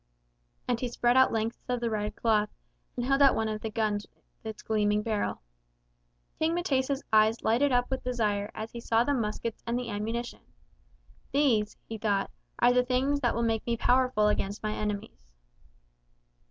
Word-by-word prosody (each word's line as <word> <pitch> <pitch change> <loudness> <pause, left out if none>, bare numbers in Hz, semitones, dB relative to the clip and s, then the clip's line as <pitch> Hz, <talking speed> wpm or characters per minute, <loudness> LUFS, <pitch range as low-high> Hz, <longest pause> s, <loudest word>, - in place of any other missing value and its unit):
And 240 -2 0
he 250 - -1
spread 240 0 +1
out 260 0 +6
lengths 225 +1 -2
of 250 -1 0
the 235 -1 -1
red 210 -1 -2
cloth, 215 -2 +2 0.5
and 245 - -1
held 275 +2 +2
out 275 -1 +6
one 220 - 0
of 215 0 -3
the 220 - -3
guns 210 -1 -1
with - - -37 0.2
its 220 -1 -7
gleaming 210 -1 +1
barrel. 215 - -2 1.0
King 320 +1 +1
M'tesa's 275 -5 0
eyes 220 +1 +4
lighted 255 +6 +3
up 245 +1 +1
with 265 - -2
desire 210 -5 -1
as 220 +1 -5
he 235 - -7
saw 230 0 +2
the 285 - 0
muskets 230 -2 -3
and 235 +1 0
the 250 -1 -4
ammunition. 225 +4 -4 0.9
These, 235 -8 +2
he 225 -1 -6
thought, 205 -2 0 0.3
are 245 +1 +4
the 250 - +5
things 265 +3 +1
that 245 -4 +1
will 235 - 0
make 225 -1 0
me 235 0 0
powerful 250 -3 +3
against 205 0 -1
my 215 0 -1
enemies. 210 - -5
230 Hz, 180 wpm, -29 LUFS, 215-250 Hz, 1.0 s, out